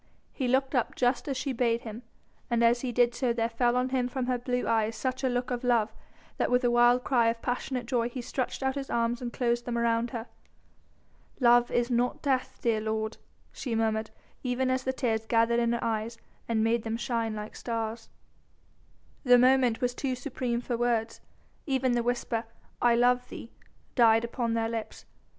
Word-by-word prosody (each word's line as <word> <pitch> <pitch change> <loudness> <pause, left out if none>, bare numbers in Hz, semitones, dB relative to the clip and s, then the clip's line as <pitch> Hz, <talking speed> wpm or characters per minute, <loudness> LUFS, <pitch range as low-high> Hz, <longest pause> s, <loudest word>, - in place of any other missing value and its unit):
He 260 - -2
looked 265 +2 +1
up 250 -4 0
just 245 +3 +1
as 275 -2 -2
she 270 +1 -2
bade 235 -1 +1
him, 225 +1 -8 0.5
and 235 -1 +2
as 235 +1 +4
he 255 - -2
did 240 0 +3
so 245 -1 0
there 230 -1 0
fell 240 +1 +1
on 250 +1 +1
him 255 -1 0
from 255 0 -3
her 250 -1 0
blue 250 0 -2
eyes 225 0 +1
such 260 +3 -3
a 260 - +2
look 245 +1 -2
of 245 0 -2
love, 230 -3 +2 0.4
that - - 0
with 250 +1 +2
a 245 - +3
wild 240 +1 +4
cry 240 -4 +3
of 230 0 0
passionate 250 0 -2
joy 240 -2 0
he 250 - -6
stretched 255 +2 -3
out 265 0 +1
his 275 -1 -5
arms 235 +1 0
and 240 -1 -4
closed 240 -1 0
them 240 -1 -2
around 235 0 +1
her. 230 -2 -5 1.1
"Love 240 -1 +5
is 240 +1 0
not 245 +5 0
death, 265 -3 0
dear 225 -2 +1
lord," 220 0 -2 0.3
she 245 -4 -4
murmured, 220 -1 0 0.3
even 255 0 0
as 260 0 0
the 260 - +1
tears 225 -4 -1
gathered 230 0 +3
in 235 0 +1
her 235 - -1
eyes 225 0 -2 0.3
and 225 -1 +1
made 230 +1 +2
them 225 0 -3
shine 230 -2 -2
like 210 0 -7
stars. 225 -1 -4 1.1
The 250 -3 +7
moment 250 -2 +4
was 245 -1 0
too 260 0 -2
supreme 245 -2 -3
for 245 0 -2
words. 230 -1 0 0.5
Even 265 -2 +1
the 240 0 +2
whisper, 235 -1 -1 0.4
"I 240 -1 +4
love 245 +1 +2
thee!" 230 - -9 0.4
died 230 -2 +5
upon 235 -1 -2
their 225 0 0
lips. 225 -1 -5
240 Hz, 195 wpm, -28 LUFS, 230-250 Hz, 1.1 s, The